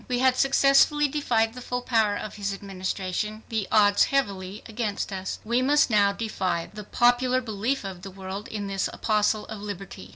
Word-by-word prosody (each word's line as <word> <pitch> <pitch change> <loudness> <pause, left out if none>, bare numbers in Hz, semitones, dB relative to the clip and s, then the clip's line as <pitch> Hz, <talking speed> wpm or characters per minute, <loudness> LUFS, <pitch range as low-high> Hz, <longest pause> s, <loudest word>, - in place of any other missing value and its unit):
We 250 - 0
had 260 0 +3
successfully 275 +2 +4
defied 235 -6 0
the 250 - -9
full 250 0 -3
power 220 -4 +2
of 215 - -6
his 200 -1 -3
Administration, 195 +2 -4
the 220 -4 -2
odds 205 -1 +5
heavily 200 -7 -2
against 215 -3 -3
us. 190 0 -4
We 235 +3 +1
must 285 0 +3
now 205 -2 +4
defy 190 -5 -2
the 210 0 -7
popular 245 +3 +3
belief 230 +2 -2
of 190 -2 -7
the 195 - -8
world 195 +2 -7
in 210 -2 -5
this 195 -1 -1
apostle 215 -1 +1
of 215 -2 -8
liberty. 200 -2 -7
215 Hz, 175 wpm, -26 LUFS, 195-245 Hz, -, odds